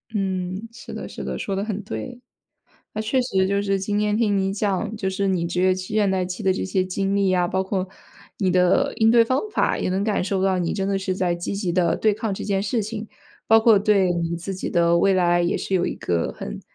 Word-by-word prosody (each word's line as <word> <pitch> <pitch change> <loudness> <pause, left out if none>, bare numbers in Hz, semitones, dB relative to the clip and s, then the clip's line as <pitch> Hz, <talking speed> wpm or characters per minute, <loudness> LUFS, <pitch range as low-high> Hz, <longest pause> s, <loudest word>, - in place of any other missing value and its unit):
嗯， 190 +1 -2
是 235 - -11
的， - - -6
是 - - -8
的， - - -4
说 195 - -3
得 195 - -1
很 210 -1 -4
对。 245 +4 -6 0.7
那 215 - -2
确 230 +5 0
实 190 -6 +1
就 200 +1 +1
是 195 -1 0
今 205 +2 -1
天 210 0 +1
听 210 -3 +2
你 195 0 0
讲， 205 +1 -1
就 195 -3 -2
是 195 +1 -1
你 180 -3 0
职 175 +1 -1
业 185 0 +4
期 185 +2 -6
倦 205 -2 +3
怠 185 -1 0
期 180 0 -6
的 190 - +2
这 - - -3
些 185 0 0
经 195 +1 -1
历 200 -1 +2
呀， 180 -1 +2
包 190 +2 0
括 190 -1 -2 0.5
你 190 -3 +1
的 185 +10 +3
应 225 -1 +4
对 235 -1 +6
方 255 +3 +1
法， - - +1
也 - - -1
能 190 +1 0
感 205 -3 0
受 190 0 -1
到 190 -1 +2
你 175 -2 -1
真 195 -1 -2
的 195 -1 +1
是 190 -1 -2
在 180 -2 0
积 175 - -4
极 180 -5 -2
地 175 -2 +2
对 215 -1 +2
抗 215 -1 -3
这 - - -6
件 195 -1 0
事 220 +2 0
情。 215 +1 -5 0.4
包 225 0 +7
括 220 -2 +5
对 200 -3 +3
你 170 0 -2
自 195 +3 -5
己 185 - -4
的 170 -1 +3
未 195 - +4
来， 175 -1 +3
也 175 - 0
是 195 - -4
有 180 - +2
一 - - -3
个 85 -1 -1
很 - - -6
195 Hz, 270 characters per minute, -23 LUFS, 185-210 Hz, 0.7 s, 包